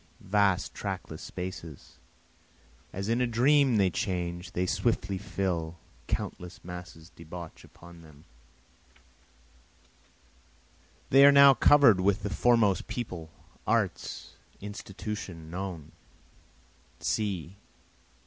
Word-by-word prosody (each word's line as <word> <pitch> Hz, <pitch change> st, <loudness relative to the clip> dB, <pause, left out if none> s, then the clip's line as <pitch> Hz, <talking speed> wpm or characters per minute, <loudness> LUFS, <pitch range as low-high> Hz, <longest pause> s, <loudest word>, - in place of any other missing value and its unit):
See, -, -, -17 dB
vast 100 Hz, -2 st, +2 dB
trackless -, -, -6 dB
spaces, 90 Hz, -5 st, -8 dB, 0.9 s
As 100 Hz, +1 st, -5 dB
in 115 Hz, +2 st, +1 dB
a 125 Hz, -, +2 dB
dream 130 Hz, +1 st, +3 dB
they 95 Hz, -3 st, +3 dB
change, 90 Hz, 0 st, -3 dB
they 90 Hz, -, 0 dB
swiftly 95 Hz, -1 st, -1 dB
fill, 85 Hz, -4 st, -3 dB, 0.3 s
Countless 90 Hz, -1 st, -5 dB
masses 90 Hz, -1 st, -10 dB
debouch 85 Hz, 0 st, -10 dB
upon 85 Hz, 0 st, -15 dB
them, 75 Hz, -1 st, -17 dB, 2.9 s
They 135 Hz, +1 st, +7 dB
are 140 Hz, -, +9 dB
now 140 Hz, 0 st, +8 dB
cover'd 130 Hz, -8 st, +6 dB
with 100 Hz, +2 st, +1 dB
the 105 Hz, -, -3 dB
foremost 110 Hz, -7 st, +2 dB
people, 90 Hz, -10 st, -5 dB, 0.4 s
arts, -, -, -1 dB, 0.3 s
institutions, 100 Hz, -4 st, -7 dB
known. 90 Hz, -4 st, -6 dB
95 Hz, 95 wpm, -28 LUFS, 85-110 Hz, 2.9 s, are